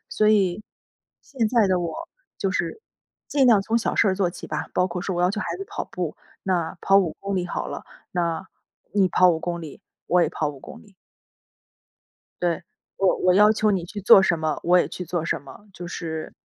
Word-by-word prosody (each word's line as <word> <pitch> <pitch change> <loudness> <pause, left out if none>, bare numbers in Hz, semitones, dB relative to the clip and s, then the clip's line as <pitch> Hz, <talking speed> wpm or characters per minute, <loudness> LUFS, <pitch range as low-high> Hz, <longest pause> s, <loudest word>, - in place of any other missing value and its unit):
所 215 - +2
以 200 -2 +2 0.6
现 255 -6 -2
在 230 -2 +3
的 185 -1 +2
我 170 -1 -3 0.5
就 195 - 0
是 175 - -2 0.5
尽 280 -2 +2
量 225 -5 +6
从 225 +3 0
小 225 - -1
事 - - +4
儿 190 - +2
做 185 -2 0
起 - - -9
吧， - - -4
包 180 - +2
括 180 -1 -5
说 190 -2 -3
我 - - 0
要 180 - +3
求 210 - -3
孩 170 -4 -3
子 195 - -5
跑 - - -5
步， 175 -4 -5 0.3
那 175 -4 -1
跑 195 - +4
5 175 -5 0
公 200 0 -3
里 180 - 0
好 - - -3
了， - - -7 0.3
那 170 +1 -1 0.5
你 195 -2 +4
跑 180 0 +5
5 165 - 0
公 170 0 -3
里， 155 -4 -10 0.2
我 180 0 +3
也 165 - +2
跑 155 -2 -1
5 145 -2 -8
公 - - -11
里。 205 -2 -21 1.5
对。 175 -1 0 0.3
我 195 -1 +2
我 180 0 +3
要 210 +2 +6
求 215 0 +1
你 190 -4 0
去 205 +4 -7
做 195 0 +8
什 175 -3 +2
么， 155 -1 -2
我 180 +1 +4
也 - - +1
去 180 - -6
做 170 -1 -2
什 160 - -2
么。 140 +9 -14
就 180 -1 -8
是， 160 -2 -5
180 Hz, 220 characters per minute, -24 LUFS, 170-200 Hz, 1.5 s, 做